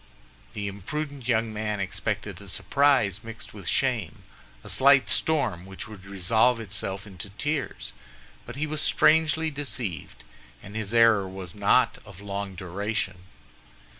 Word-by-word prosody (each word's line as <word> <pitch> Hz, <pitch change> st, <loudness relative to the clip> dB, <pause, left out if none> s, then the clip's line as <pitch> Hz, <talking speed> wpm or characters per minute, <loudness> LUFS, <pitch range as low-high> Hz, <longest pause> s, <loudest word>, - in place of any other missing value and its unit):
The 100 Hz, -1 st, -2 dB
imprudent 135 Hz, +7 st, -5 dB
young 115 Hz, -2 st, +1 dB
man 105 Hz, -1 st, -2 dB
expected 100 Hz, 0 st, -3 dB
a 100 Hz, -, -10 dB
surprise, 125 Hz, -4 st, +2 dB
mixed 115 Hz, 0 st, -8 dB
with -, -, -9 dB
shame—a -, -, -3 dB
slight 135 Hz, 0 st, +5 dB
storm 140 Hz, -, +1 dB
which 95 Hz, 0 st, -8 dB
would 105 Hz, -3 st, -11 dB
resolve 110 Hz, +5 st, +2 dB
itself 100 Hz, -2 st, -4 dB
into 100 Hz, -1 st, -7 dB
tears; 140 Hz, +7 st, -3 dB, 0.5 s
but 120 Hz, -, -9 dB
he 145 Hz, +3 st, -1 dB
was 155 Hz, 0 st, -2 dB
strangely 160 Hz, 0 st, +4 dB
deceived, 120 Hz, -, -4 dB, 0.4 s
and 105 Hz, -, -10 dB
his 110 Hz, +1 st, -2 dB
error 115 Hz, -4 st, +5 dB
was 95 Hz, -2 st, -7 dB
not 105 Hz, +4 st, +3 dB
of 100 Hz, -3 st, -13 dB
long 100 Hz, -1 st, -4 dB
duration. 95 Hz, +1 st, -3 dB
105 Hz, 135 wpm, -26 LUFS, 95-130 Hz, 0.5 s, slight